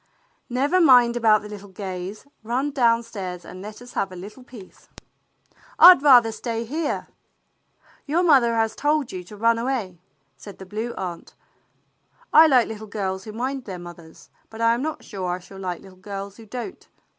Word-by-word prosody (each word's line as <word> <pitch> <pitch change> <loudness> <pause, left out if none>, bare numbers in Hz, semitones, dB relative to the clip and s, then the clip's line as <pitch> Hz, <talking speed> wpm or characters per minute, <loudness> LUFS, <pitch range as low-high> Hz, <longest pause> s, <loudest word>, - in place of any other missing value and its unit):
"Never 280 +9 +1
mind 245 -6 +6
about 220 -3 +3
the - - -8
little 205 -1 -10
Gays. 190 +2 -7 0.2
Run 250 +6 -2
down 235 -4 +2
stairs 185 -6 -7
and 185 - -10
let 215 +4 -9
us 245 - -13
have 195 -1 -2
a - - -9
little 205 +8 -10
peace." 230 -7 -15 0.9
"I'd 360 -5 +9
rather 245 -6 +6
stay 230 0 -4
here." 300 +5 -3 1.0
"Your 330 +5 +1
mother 260 -8 +4
has 225 -1 0
told 295 -3 0
you 180 -1 -6
to 205 +4 -13
run 230 +2 +2
away," 230 -8 -3 0.4
said 200 -3 -12
the 190 - -10
Blue 220 +5 -5
Aunt. 180 -3 -7 0.5
" - - -36
I 320 +1 +9
like 255 -5 +4
little 220 0 -8
girls 190 -2 -4
who 215 - -7
mind 255 +4 -4
their 190 -3 -6
mothers, 175 -2 -13 0.2
but 220 - -11
I 230 0 +3
am 240 - -2
not 310 +2 -4
sure 185 -3 -5
I 180 - -1
shall 190 +2 -13
like 180 -2 -4
little 185 -1 -16
girls 200 0 -7
who 225 -1 -14
don't. 245 - -7
225 Hz, 185 wpm, -23 LUFS, 195-250 Hz, 1.0 s, I'd